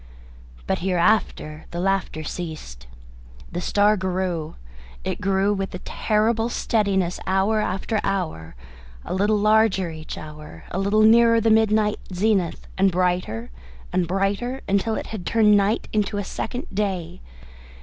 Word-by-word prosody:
But - - -1
hereafter 175 -4 0
the 170 - -5
laughter 190 -4 -1
ceased. 150 - -7 0.6
The 175 - -3
star 205 +3 +3
grew 185 -4 -2 0.5
it - - -3
grew 195 +1 +2
with 195 -2 -3
a 180 - -9
terrible 225 +2 +1
steadiness 195 -7 0
hour 195 +3 +2
after 210 +3 -1
hour, 160 - -3 0.5
a - - -4
little 205 +3 +2
larger 210 -4 +3
each 155 0 -8
hour, 150 - -10
a 185 - -2
little 205 +2 +3
nearer 230 +1 +6
the 225 0 +2
midnight 215 -1 +3
zenith, 185 -2 0
and 195 0 +4
brighter 180 - -1 0.4
and 180 -2 +1
brighter, 200 +8 -1
until 200 +3 +1
it - - -4
had 205 -5 -5
turned 210 +1 +4
night 205 +3 +1
into 210 -1 0
a 205 - -1
second 245 +5 -4
day. 190 - -2
195 Hz, 140 wpm, -23 LUFS, 180-215 Hz, 0.6 s, nearer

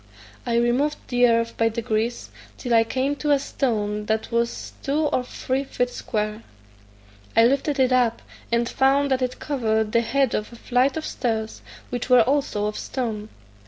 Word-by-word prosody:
I 235 - +1
removed 245 +6 +2
the 245 0 +4
earth 230 0 +1
by 225 0 +3
degrees, 225 +1 -2 0.3
till 245 -2 -2
I 225 -1 +6
came 265 +5 -1
to 300 - -2
a 290 - +5
stone 210 -7 -2
that 220 +2 -1
was 235 0 -1
two 285 +3 0
or 290 -4 +1
three 260 +2 -2
feet 245 -2 -2
square. 215 -1 -3 1.0
I 225 - +8
lifted 275 +3 +1
it 260 -1 +3
up, 245 -2 +2 0.3
and 235 0 +2
found 275 +2 +2
that 260 0 +2
it 250 0 -2
covered 220 -6 0
the 235 - +3
head 270 +1 +1
of 210 - -2
a - - -11
flight 255 +4 +1
of 315 - -4
stairs, 220 -3 -3 0.3
which 245 +1 -3
were 250 -1 +7
also 260 -5 0
of 210 0 -3
stone. 220 -5 -4
240 Hz, 175 wpm, -23 LUFS, 225-265 Hz, 1.0 s, I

